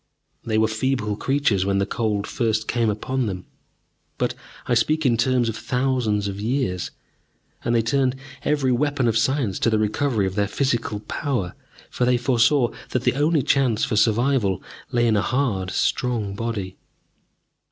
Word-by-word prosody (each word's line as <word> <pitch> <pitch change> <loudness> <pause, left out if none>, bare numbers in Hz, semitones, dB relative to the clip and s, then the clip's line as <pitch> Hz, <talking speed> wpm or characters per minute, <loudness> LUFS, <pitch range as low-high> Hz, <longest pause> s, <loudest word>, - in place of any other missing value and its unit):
They 110 -1 0
were 110 0 +4
feeble 110 -1 -1
creatures 135 -6 +1
when 100 0 +1
the 100 - +2
Cold 105 -1 -1
first 110 -1 -1
came 115 -2 +1
upon 125 +4 -1
them, 90 -2 -5 0.7
but - - 0 0.3
I - - 0
speak 155 +7 +2
in 120 -3 +4
terms 125 +1 +2
of 115 - -2
thousands 120 -3 0
of 100 0 -5
years; 115 -6 -1 0.7
and 120 0 +1
they 115 - +3
turned 130 +2 +1 0.3
every 145 -3 +1
weapon 140 0 +1
of 115 - +1
science 115 -3 +1
to - - +2
the 110 - +2
recovery 110 +1 +1
of 95 - -2
their 100 0 +1
physical 115 -3 -1
power, 120 -8 -2 0.4
for 125 - 0
they 125 0 +3
foresaw 120 +1 +3 0.2
that 125 - -1
the - - +2
only 150 +1 +2
chance 125 -6 +2
for - - -2
survival 110 -2 +2 0.3
lay 120 0 +2
in 115 -2 +3
a 100 - +3
hard, 110 -8 0
strong 110 +1 0
body. 100 -4 -4
115 Hz, 165 wpm, -23 LUFS, 105-130 Hz, 0.7 s, were